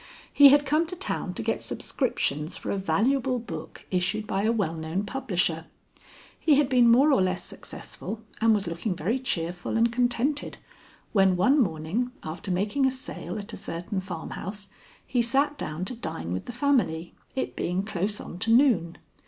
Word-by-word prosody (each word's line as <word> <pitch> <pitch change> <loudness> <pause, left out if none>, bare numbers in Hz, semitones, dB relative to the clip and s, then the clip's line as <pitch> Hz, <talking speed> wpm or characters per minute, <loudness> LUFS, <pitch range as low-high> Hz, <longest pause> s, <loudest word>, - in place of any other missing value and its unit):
He 285 -1 +9
had 290 +1 +5
come 305 +4 +2
to 360 - -6
town 360 - -3
to - - -3
get - - -1
subscriptions 155 - -1
for - - -4
a - - 0
valuable 255 +6 +1
book 230 -1 -8
issued 185 +4 0
by 195 -1 -1
a 220 +2 +2
well 200 -8 0
known 160 +4 -3
publisher. 175 -9 -1 0.7
He 305 - +4
had 280 -2 +3
been 245 -3 +5
more 265 +6 +6
or 260 - +4
less 185 -1 0
successful, 220 0 -8 0.2
and 225 0 +5
was 205 - -1
looking 170 +4 -2
very 205 +11 -1
cheerful 175 -5 -2
and 230 +1 +3
contented, 245 +4 0 0.6
when 190 -3 +4
one 260 +11 +4
morning, 185 +6 -1
after 160 +4 -6
making 205 +9 +1
a - - +4
sale 260 -4 -6
at 200 -1 -6
a - - -5
certain 180 +3 -4
farmhouse, 190 +3 -6 0.4
he 245 -2 +1
sat 275 +5 +2
down 170 - -4
to 220 - -5
dine 85 - -5
with 95 - -4
the - - -5
family, 240 - +1 0.2
it 265 - -2
being 180 +2 -1
close 205 0 -2
on 175 - -8
to 225 - -1
noon. 230 - +4
215 Hz, 175 wpm, -27 LUFS, 180-255 Hz, 0.7 s, He